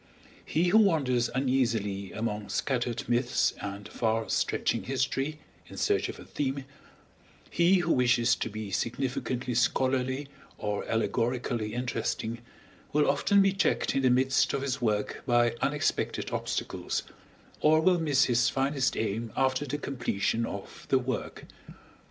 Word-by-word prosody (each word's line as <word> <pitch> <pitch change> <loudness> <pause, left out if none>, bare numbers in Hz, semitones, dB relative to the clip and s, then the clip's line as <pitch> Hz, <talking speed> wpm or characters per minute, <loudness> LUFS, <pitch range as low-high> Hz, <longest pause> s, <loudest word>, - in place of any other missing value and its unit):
He 175 +3 +1
who 220 - +6
wanders 135 - +2
uneasily 115 -8 0
among 105 -2 -3
scattered 120 +2 -1
myths 120 +1 +2
and 100 0 -6
far 110 -1 -1
stretching - - 0
history 135 +3 -1 0.3
in - - -11
search - - +1
of - - -7
a - - -11
theme, 135 -1 -3 0.9
he 175 +3 +4
who 175 -3 +2
wishes 125 -1 +3
to - - -3
be 105 -1 -6
significantly 125 +3 -2
scholarly 130 +3 +1 0.3
or 105 -1 -2
allegorically 115 -1 -1
interesting, 120 -2 -2 0.5
will 150 0 +3
often 200 +7 +4
be 195 -1 +3
checked 195 - +1
in 135 - +1
the 130 - +4
midst 130 +1 +3
of 140 - -1
his 135 -1 -2
work 105 -3 -1
by 120 -1 +3
unexpected 145 +1 -1
obstacles, - - -2 0.6
or 155 +1 +5
will 180 +2 +3
miss 145 -5 +3
his 120 -1 +3
finest 135 0 0
aim 110 +1 -2
after 130 +2 +1
the 145 +3 -2
completion 115 -5 -1
of 100 - -8
the 135 - +5
work. 130 -3 -4
125 Hz, 140 wpm, -29 LUFS, 115-140 Hz, 0.9 s, who